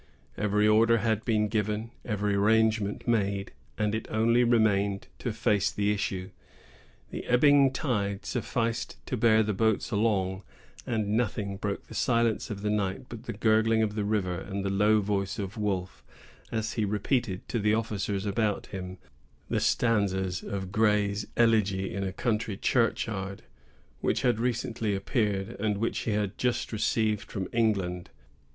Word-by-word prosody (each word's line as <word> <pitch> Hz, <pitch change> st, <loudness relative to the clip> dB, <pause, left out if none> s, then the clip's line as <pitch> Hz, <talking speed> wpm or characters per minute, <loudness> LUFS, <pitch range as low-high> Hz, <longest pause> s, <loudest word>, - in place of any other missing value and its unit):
Every 105 Hz, 0 st, +2 dB
order 115 Hz, +2 st, +5 dB
had 110 Hz, -1 st, 0 dB
been 110 Hz, -2 st, +2 dB
given, 105 Hz, +1 st, -2 dB
every 105 Hz, -2 st, -1 dB
arrangement 110 Hz, +1 st, +2 dB
made, 100 Hz, -4 st, 0 dB, 0.3 s
and 105 Hz, -1 st, 0 dB
it 110 Hz, -, -3 dB
only 115 Hz, +2 st, +3 dB
remained 105 Hz, -4 st, +2 dB
to -, -, -2 dB
face 105 Hz, -3 st, +1 dB
the 105 Hz, 0 st, 0 dB
issue. 95 Hz, -2 st, -2 dB, 0.8 s
The -, -, -5 dB
ebbing 140 Hz, +2 st, +5 dB
tide 105 Hz, -8 st, -2 dB
sufficed 115 Hz, +3 st, -2 dB
to -, -, -2 dB
bear 110 Hz, -1 st, +4 dB
the 105 Hz, 0 st, -1 dB
boats 110 Hz, +4 st, +1 dB
along, 100 Hz, -3 st, +1 dB, 0.5 s
and 110 Hz, -3 st, -1 dB
nothing 105 Hz, -3 st, -1 dB
broke 100 Hz, -1 st, -3 dB
the -, -, -12 dB
silence 115 Hz, -2 st, +1 dB
of 105 Hz, -2 st, -6 dB
the 105 Hz, -, 0 dB
night 100 Hz, +2 st, -2 dB
but 120 Hz, 0 st, -9 dB
the -, -, -4 dB
gurgling 110 Hz, 0 st, +3 dB
of 105 Hz, -1 st, -1 dB
the 105 Hz, -1 st, -2 dB
river, 100 Hz, -4 st, -1 dB
and 100 Hz, 0 st, -5 dB
the 100 Hz, -, 0 dB
low 105 Hz, +2 st, +3 dB
voice 100 Hz, -1 st, -1 dB
of 100 Hz, -1 st, -4 dB
Wolfe, 95 Hz, -4 st, -3 dB, 0.5 s
as 110 Hz, 0 st, -2 dB
he 110 Hz, -, 0 dB
repeated 105 Hz, 0 st, -1 dB
to 120 Hz, -, -1 dB
the 105 Hz, +1 st, +2 dB
officers 105 Hz, -3 st, -2 dB
about 105 Hz, 0 st, 0 dB
him 95 Hz, -1 st, -6 dB, 0.5 s
the -, -, +1 dB
stanzas 95 Hz, -5 st, +1 dB
of 95 Hz, -2 st, -5 dB
Gray's 105 Hz, -1 st, +1 dB
"Elegy 105 Hz, -5 st, +2 dB
in 100 Hz, -, -2 dB
a 95 Hz, -, -2 dB
Country 110 Hz, -1 st, -1 dB
Churchyard," 105 Hz, -5 st, 0 dB, 0.6 s
which -, -, 0 dB
had 120 Hz, -3 st, +2 dB
recently 115 Hz, -3 st, -1 dB
appeared 100 Hz, -1 st, -1 dB
and 105 Hz, -1 st, 0 dB
which 115 Hz, +3 st, -1 dB
he 115 Hz, -, -2 dB
had 105 Hz, -1 st, -2 dB
just 125 Hz, -2 st, -1 dB
received 110 Hz, -1 st, 0 dB
from 95 Hz, -3 st, -3 dB
England. 95 Hz, -6 st, 0 dB
105 Hz, 155 wpm, -28 LUFS, 100-115 Hz, 0.8 s, order